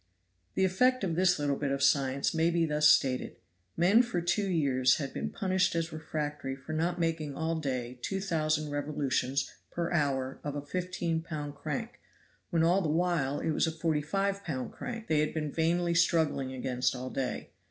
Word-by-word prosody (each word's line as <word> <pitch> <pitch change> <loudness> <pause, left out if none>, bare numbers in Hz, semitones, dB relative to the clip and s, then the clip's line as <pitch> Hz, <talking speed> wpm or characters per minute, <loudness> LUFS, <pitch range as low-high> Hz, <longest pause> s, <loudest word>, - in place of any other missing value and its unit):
* 90 0 -44
The 190 - +3
effect 250 +6 +2
of 175 -4 0
this 180 +1 +3
little 145 -2 0
bit 145 - -1
of 140 0 0
science 140 -1 +2
may 165 +1 +2
be 170 -1 +2
thus 150 -1 +4
stated 130 -4 +2 0.4
Men 190 +8 +6
for 240 -7 -2
two 185 +4 0
years 135 -7 +3
had 140 -3 -4
been - - -3
punished 190 -2 +1
as 165 0 -1
refractory 150 -3 -4
for 135 +4 -8
not 170 +3 0
making 160 -4 -1
all 160 0 -1
day 125 -4 -3
two 195 +9 -2
thousand 155 -5 0
revolutions 140 -2 -1 0.2
per 170 0 -3
hour 135 -4 0
of 145 -1 -4
a 145 0 -5
15 175 -1 -2
lb. 150 -3 -5
crank, 190 +12 -5 0.5
when 165 -3 +2
all 175 +4 +4
the 160 - -1
while 160 -4 +1
it 160 - 0
was 155 - +2
a - - 0
45 170 +5 -1
lb. 130 -7 -3
crank 230 -2 -6
they 155 -5 +2
had 150 +1 0
been 150 -2 -2
vainly 170 +2 +1
struggling 160 -5 +2
against 130 0 -1
all 130 +1 -5
day. 130 -2 -3
155 Hz, 185 wpm, -30 LUFS, 140-175 Hz, 0.5 s, Men